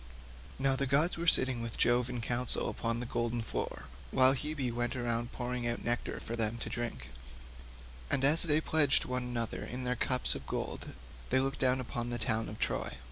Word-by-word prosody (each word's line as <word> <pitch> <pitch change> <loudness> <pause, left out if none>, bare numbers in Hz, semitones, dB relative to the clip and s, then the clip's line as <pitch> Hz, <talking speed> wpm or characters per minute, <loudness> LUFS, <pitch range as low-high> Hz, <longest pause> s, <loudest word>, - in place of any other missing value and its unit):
Now 135 0 +2
the 140 0 -1
gods 150 +7 +3
were 170 +1 -4
sitting 130 -6 +3
with 115 -1 -5
Jove 120 +1 +3
in 125 -2 -3
council 120 +1 -1
upon 115 0 -2
the 125 - -4
golden 120 0 -1
floor - - -4 0.2
while 130 - +5
Hebe 140 -2 -2
went 120 +2 -1
round 120 -1 -1
pouring 125 -1 -3
out 120 - -2
nectar 120 0 -1
for 115 - -5
them 115 0 0
to - - -4
drink, 70 - -5 1.0
and 135 - +2
as 150 +4 +9
they 155 -2 +5
pledged 150 -3 +3
one 125 0 -2
another 120 -2 -3
in 125 +2 -5
their 125 0 0
cups 125 +1 +1
of - - -8
gold - - -4 0.4
they - - +3
looked 135 +1 -1
down 130 0 +3
upon 120 -1 -4
the 120 - -2
town 115 -1 0
of 105 - -7
Troy. 60 - -2
125 Hz, 195 wpm, -32 LUFS, 120-130 Hz, 1.0 s, as